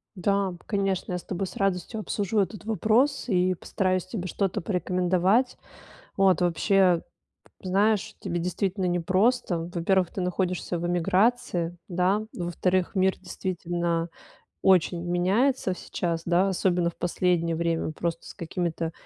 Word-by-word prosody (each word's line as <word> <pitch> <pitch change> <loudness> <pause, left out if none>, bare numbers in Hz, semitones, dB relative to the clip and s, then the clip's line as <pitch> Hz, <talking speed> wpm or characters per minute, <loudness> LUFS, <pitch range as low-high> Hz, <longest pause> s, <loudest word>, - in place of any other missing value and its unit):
Да, 195 0 0
конечно, 195 -3 -1
я - - 0
с 180 - -9
тобой 190 0 -3
с - - -10
радостью 195 +3 -1
обсужу 210 0 -1
этот 205 +2 -2
вопрос 225 - +2
и 185 -2 +2
постараюсь 185 +1 -1
тебе 185 -2 -5
что-то 195 +2 -1
порекомендовать. 185 +5 +1 0.6
Вот, 190 -2 +4
вообще, 180 0 +3 0.6
знаешь, 210 +3 +1
тебе 175 -3 -3
действительно 185 +2 -1
непросто. 180 0 +1
Во-первых, 180 +1 +2
ты 190 - -4
находишься 180 -1 -1
в 175 - -2
эмиграции, 175 -1 +1
да? 185 +4 +1
Во-вторых, 180 +2 0
мир 190 0 +3
действительно 175 -2 -2 0.5
очень 175 -2 +3
меняется 190 +6 +1
сейчас, 170 -2 -3
да, 175 +3 +3
особенно 180 -2 +1
в - - -27
последнее 175 -2 +1
время, 165 -1 -1
просто 170 +1 -4
с - - -9
какими-то 170 -2 -3
185 Hz, 130 wpm, -26 LUFS, 175-195 Hz, 0.6 s, Вот